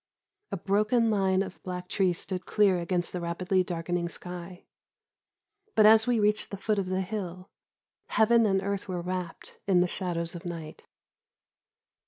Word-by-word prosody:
A - - -2
broken 215 +5 +2
line 190 -2 +2
of 190 - -10
black 180 -1 -5
trees 185 -2 +1
stood 185 -1 -3
clear 200 -4 +3
against 175 0 -1
the 180 - -3
rapidly 180 +2 0
darkening 175 0 -2
sky, 180 0 -8 1.1
but, 215 - +6
as 220 +1 +7
we 240 -2 +2
reached 210 0 +1
the 200 - -6
foot 210 +1 0
of 190 - -2
the 185 0 0
hill, 185 -2 -5 0.6
heaven 230 0 +4
and 195 -1 +1
earth 200 0 -3
were 180 -2 -3
wrapped 180 -1 -5
in 185 -3 +4
the - - +4
shadows 170 -2 -3
of 175 - -8
night. 165 -3 -7
185 Hz, 160 wpm, -28 LUFS, 175-205 Hz, 1.1 s, as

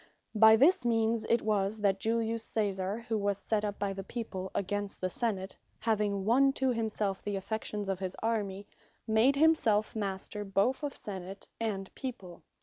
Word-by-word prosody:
By 220 0 +8
this 280 +5 +5
means 225 -1 +1
it 235 - +3
was, 210 -1 +1
that 195 -1 +2
Julius 225 0 0
Caesar, 200 0 -1
who 220 -2 0
was 200 -1 0
set 210 +1 -1
up 205 -1 -2
by 200 -1 -1
the 195 0 -6
People 190 -4 -5
against 205 +1 -2
the 185 0 -2
Senate, 195 -5 -2 0.2
having 210 -3 0
won 270 +5 +4
to 265 -1 +1
himselfe 215 -4 -1
the 205 -1 -3
affections 210 +1 -3
of 195 -1 -1
his 185 -1 -4
Army, 205 -3 -1 0.4
made 225 +5 +4
himselfe 270 -10 +3
Master, 205 0 -3
both 200 +7 +1
of 290 -2 -3
Senate 195 -1 -8
and 200 -4 -3
People. 195 -9 -7
210 Hz, 165 wpm, -31 LUFS, 195-230 Hz, 0.4 s, By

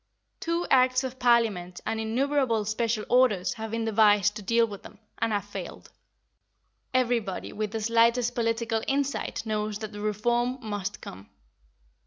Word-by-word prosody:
Two 335 +1 -1
Acts 255 0 +4
of 260 0 -6
Parliament 220 -8 +2
and 220 +1 -2
innumerable 235 0 0
special 220 0 -1
orders 215 -8 +3
have 220 0 -6
been 225 +1 -2
devised 210 -2 +4
to 215 - -6
deal 230 +3 +3
with 205 -3 -9
them, - - -13 0.2
and 225 - 0
have 205 -1 -1
failed. - - -8 1.0
Everybody 240 -6 -1
with 215 0 -2
the 220 +1 -4
slightest 230 +2 +3
political 230 -1 0
insight 275 -3 -1
knows 215 -1 -2
that 215 0 -6
the 205 -1 -8
reform 240 +4 0
must 205 -4 -5
come. 95 +2 -10
225 Hz, 150 wpm, -27 LUFS, 210-245 Hz, 1.0 s, Acts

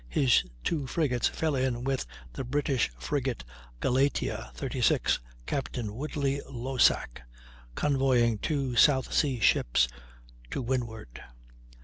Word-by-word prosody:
his 125 - +4 0.2
two 150 -5 -1
frigates 130 -6 +1
fell 160 -2 -1
in 130 -2 0
with 135 - -1 0.3
the - - -4
British 135 - 0
frigate 130 - -2 0.4
Galatea, 135 - 0
36, - - +1 0.3
Captain 120 - -3
Woodley 140 +1 -2
Losack, 125 - +1 0.5
convoying 130 -6 +2
two 135 -4 -1
South 130 +1 +4
Sea 135 -6 +2
ships, 60 - +3 0.6
to - - -3
windward. 115 - -4
130 Hz, 105 wpm, -29 LUFS, 120-140 Hz, 0.6 s, his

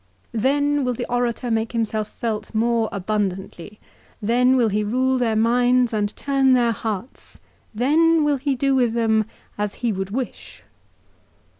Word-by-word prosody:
l 225 - -2
" - - -2
Then 285 +2 +2
will 250 -1 -1
the 245 - -4
orator 245 0 -1
make 225 +1 -1
himself 220 -2 -1
felt 220 -1 -5
more 230 0 +1
abundantly. 200 -1 -4 0.4
Then 250 +4 +3
will 240 -4 +3
he 210 +1 0
rule 255 +4 +1
their 230 -3 +1
minds 245 +2 +3
and 205 -1 0
turn 270 -2 +2
their 240 -2 +3
hearts. 220 +2 -6 0.3
Then 310 +8 +3
will 295 -1 +2
he 275 +1 -1
do 275 +2 +1
with 245 -4 +2
them 220 -2 +2 0.3
as 210 -1 -2
he 235 - +2
would 190 0 -4
wish." 250 +4 -6
235 Hz, 160 wpm, -22 LUFS, 215-260 Hz, 0.4 s, Then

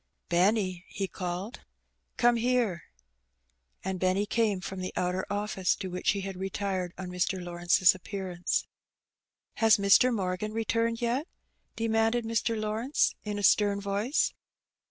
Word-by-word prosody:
'^Benny,^^ 185 0 +2
he 195 - -3
called, 185 +5 -5 0.6
"come 240 0 +4
here." 230 -7 0 1.0
And 190 -1 -3
Benny 185 +3 +1
came 225 -1 +1
in 185 - -7
from 190 0 -6
the 185 - -4
outer 180 +1 -1
office, 205 -2 0
to 190 - -6
which 180 - -1
he 200 - -3
had 195 0 -5
retired 190 -1 -2
on 185 -1 -6
Mr. 180 +1 -1
Lawrence's 175 +1 +3
appearance. 185 -1 -3 0.9
"Has 225 -1 +5
Mr. 200 +5 +5
Morgan 195 0 -2
returned 230 +1 0
yet?'' 250 +7 0 0.5
demanded 225 +1 +1
Mr. 225 0 0
Law 215 0 -2
rence, 255 +6 +1
in 210 -1 -4
a 205 - -4
stem 205 0 +4
voice. 200 +7 0
200 Hz, 140 wpm, -29 LUFS, 185-225 Hz, 1.0 s, Has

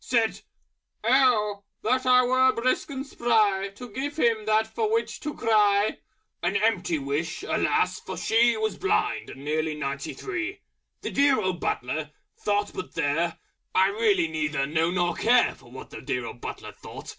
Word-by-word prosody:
Said 230 -3 +1 0.6
"Oh! 220 -5 +3 0.2
that 255 +3 +1
I 250 0 +6
were 260 +1 +4
Brisk 255 +6 0
and 270 -1 -5
Spry 215 -7 +1
To 245 +1 -10
give 285 +6 -4
him 230 -6 +1
that 215 0 +3
for 425 - -2
which 455 +1 -1
to 300 -1 -5
cry!" 210 -2 +3 0.4
(An 195 - 0
empty 200 -5 +1
wish, 145 - -3
alas! 435 +1 +1
for - - -7
she 230 +1 +3
Was 220 0 -2
Blind 395 +1 0
and 135 +1 -10
nearly 155 +1 -1
ninety 140 -2 -4
three). 365 0 -4 0.4
The - - -4
Dear 280 -3 +4
Old 185 -4 -1
Butler 150 +5 -2 0.3
thought 205 0 -1
but 185 - -7
there! 165 +2 0 0.4
I 190 +1 +5
really 200 -5 +2
neither 155 -3 -1
know 160 +3 +1
nor 175 -1 +1
care 240 +6 +3
For - - -18
what 130 +2 -11
the - - -8
Dear 125 -1 -2
Old 120 +1 -8
Butler - - -6
thought! - - -11
210 Hz, 170 wpm, -26 LUFS, 165-250 Hz, 0.6 s, I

